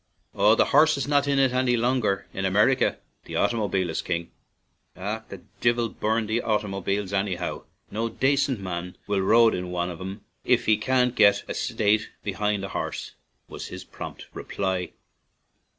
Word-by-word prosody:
"Oh, 105 Hz, +2 st, +5 dB
the -, -, +4 dB
horse 155 Hz, +1 st, +6 dB
is 140 Hz, -, -2 dB
not 145 Hz, -1 st, +2 dB
'in 140 Hz, -1 st, +2 dB
it' 135 Hz, -2 st, +4 dB
any 125 Hz, -1 st, +2 dB
longer 115 Hz, -5 st, +1 dB
in 95 Hz, -, -3 dB
America; 105 Hz, +7 st, +3 dB, 0.3 s
the -, -, -7 dB
automobile 100 Hz, -5 st, +1 dB
is 80 Hz, -, -2 dB
king." 85 Hz, -1 st, -3 dB, 0.3 s
" -, -, -46 dB
Ach! 105 Hz, +4 st, -4 dB
the 95 Hz, -, -9 dB, 0.2 s
divil 120 Hz, -1 st, +2 dB
burn 110 Hz, +2 st, -1 dB
the 110 Hz, +3 st, 0 dB
oightymoobiles 100 Hz, -2 st, -1 dB
annyhow; 95 Hz, -2 st, -2 dB, 0.3 s
no 115 Hz, +2 st, -1 dB
dacent 135 Hz, -1 st, +1 dB
man 90 Hz, -1 st, -5 dB
will 100 Hz, -2 st, 0 dB
roide 115 Hz, +4 st, +5 dB
in 90 Hz, 0 st, -3 dB
wan 90 Hz, 0 st, -2 dB
av 85 Hz, -, -9 dB
'em 95 Hz, +3 st, -6 dB, 0.2 s
if -, -, +2 dB
he 110 Hz, -, +5 dB
can 125 Hz, +3 st, +2 dB
get 105 Hz, -4 st, +4 dB
a -, -, -3 dB
sate 105 Hz, 0 st, +1 dB
behind 105 Hz, 0 st, -1 dB
a -, -, -6 dB
harse," -, -, -4 dB, 0.4 s
was -, -, -7 dB
his -, -, -8 dB
prompt -, -, -9 dB
reply. 95 Hz, -2 st, -3 dB
105 Hz, 170 wpm, -25 LUFS, 95-120 Hz, 0.4 s, horse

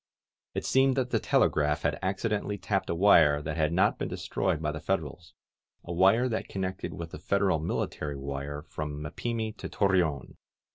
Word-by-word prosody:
It -, -, -2 dB
seemed 135 Hz, 0 st, +3 dB
that 125 Hz, -2 st, 0 dB
the -, -, +2 dB
telegraph 75 Hz, 0 st, +2 dB
had 80 Hz, 0 st, 0 dB
acci 95 Hz, +3 st, -1 dB
dentally 105 Hz, -1 st, -1 dB
tapped 95 Hz, -2 st, -1 dB
a 85 Hz, -, 0 dB
wire 80 Hz, -6 st, +6 dB
that 75 Hz, +1 st, -4 dB
had 80 Hz, -1 st, +1 dB
not 90 Hz, +3 st, +2 dB
been -, -, -2 dB
destroyed 95 Hz, -5 st, -1 dB
by 75 Hz, -1 st, -1 dB
the 75 Hz, -, -5 dB
Federals -, -, -3 dB, 0.3 s
— -, -, -34 dB
^a 85 Hz, -, -4 dB
wire 100 Hz, +8 st, +4 dB
that 115 Hz, -3 st, -3 dB
connected 95 Hz, -1 st, -4 dB
with 85 Hz, -1 st, -7 dB
the -, -, -8 dB
Federal 95 Hz, -2 st, +1 dB
military 75 Hz, -2 st, -3 dB
wire 70 Hz, +1 st, -5 dB
from 75 Hz, -2 st, -5 dB
Mapimi 110 Hz, +7 st, -3 dB
to -, -, -6 dB
Torreon. 90 Hz, -, 0 dB
85 Hz, 185 wpm, -28 LUFS, 75-100 Hz, 0.3 s, wire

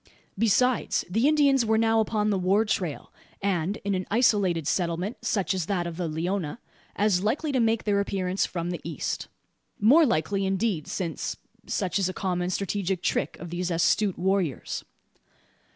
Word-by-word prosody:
Besides, 230 Hz, +4 st, +2 dB
the 225 Hz, +8 st, +3 dB
Indians 285 Hz, -4 st, +4 dB
were 220 Hz, 0 st, +2 dB
now 225 Hz, 0 st, +3 dB
upon 215 Hz, -1 st, +1 dB
the 195 Hz, -, +1 dB
war 195 Hz, +4 st, +3 dB
trail; 180 Hz, -8 st, -3 dB, 0.3 s
and, 195 Hz, 0 st, -1 dB
in 200 Hz, -, +1 dB
an 185 Hz, -1 st, -2 dB
isolated 200 Hz, -, +2 dB
settlement 180 Hz, +5 st, -1 dB
such 195 Hz, -2 st, 0 dB
as 185 Hz, -4 st, -2 dB
that 185 Hz, -4 st, 0 dB
of 170 Hz, -1 st, -5 dB
the 175 Hz, -2 st, -2 dB
Leona, 165 Hz, +2 st, -2 dB, 0.4 s
as 200 Hz, -3 st, +2 dB
likely 285 Hz, +8 st, 0 dB
to 260 Hz, -, +1 dB
make 225 Hz, -1 st, +2 dB
their 205 Hz, -1 st, +1 dB
appearance 190 Hz, -1 st, -1 dB
from 175 Hz, -1 st, -3 dB
the 175 Hz, -, -5 dB
east. 160 Hz, -4 st, -3 dB, 0.5 s
More 265 Hz, +11 st, +6 dB
likely, 195 Hz, +2 st, 0 dB
indeed, 190 Hz, -3 st, 0 dB
since 170 Hz, -4 st, -3 dB, 0.3 s
such 190 Hz, -1 st, -1 dB
is 190 Hz, -1 st, +1 dB
a -, -, -4 dB
common 180 Hz, -2 st, -1 dB
strategic 190 Hz, -1 st, -2 dB
trick -, -, -1 dB
of 170 Hz, -, -8 dB
these 175 Hz, +1 st, -2 dB
astute 180 Hz, +4 st, +2 dB
warriors. 185 Hz, -6 st, -1 dB
195 Hz, 165 wpm, -26 LUFS, 175-215 Hz, 0.5 s, More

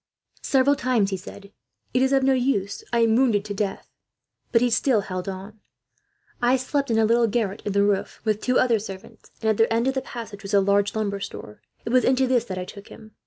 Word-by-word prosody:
Several 275 Hz, +1 st, +3 dB
times 245 Hz, -7 st, +1 dB
he -, -, 0 dB
said: 200 Hz, +1 st, -12 dB, 0.4 s
"It 255 Hz, -, +2 dB
is 265 Hz, 0 st, +2 dB
of 270 Hz, -1 st, +3 dB
no 270 Hz, 0 st, +4 dB
use; 245 Hz, -7 st, -1 dB
I 235 Hz, -1 st, +2 dB
am 225 Hz, -1 st, +3 dB
wounded 230 Hz, -5 st, +2 dB
to 205 Hz, -, -4 dB
death!" 200 Hz, -1 st, -3 dB, 0.6 s
but 230 Hz, -, +4 dB
he 245 Hz, 0 st, +1 dB
still 230 Hz, -1 st, +2 dB
held 185 Hz, -1 st, -5 dB
on. 195 Hz, +3 st, -8 dB, 0.8 s
"'I 245 Hz, +2 st, +4 dB
slept 280 Hz, +2 st, -2 dB
in 225 Hz, -, +1 dB
a 225 Hz, -, +4 dB
little 230 Hz, +1 st, +3 dB
garret 210 Hz, -2 st, -2 dB
in 205 Hz, -, -2 dB
the 200 Hz, 0 st, +3 dB
roof, 200 Hz, -1 st, -1 dB
with 215 Hz, -2 st, 0 dB
two 255 Hz, 0 st, +1 dB
other 235 Hz, -3 st, +3 dB
servants, 195 Hz, -1 st, -10 dB
and 220 Hz, -, +1 dB
at 215 Hz, -, -1 dB
the 225 Hz, -, +3 dB
end 230 Hz, +2 st, +1 dB
of 265 Hz, -, +1 dB
the 265 Hz, -, -2 dB
passage 225 Hz, -5 st, -8 dB
was 200 Hz, +1 st, -2 dB
a -, -, +6 dB
large 200 Hz, +1 st, +1 dB
lumber 200 Hz, -2 st, -2 dB
store. 105 Hz, -, -8 dB, 0.2 s
It -, -, -3 dB
was 255 Hz, 0 st, +4 dB
into 260 Hz, 0 st, +3 dB
this 250 Hz, -2 st, +1 dB
that 185 Hz, -, -6 dB
I 180 Hz, -, -4 dB
took 200 Hz, +2 st, -11 dB
him. 215 Hz, 0 st, -14 dB
220 Hz, 235 wpm, -24 LUFS, 200-250 Hz, 0.8 s, a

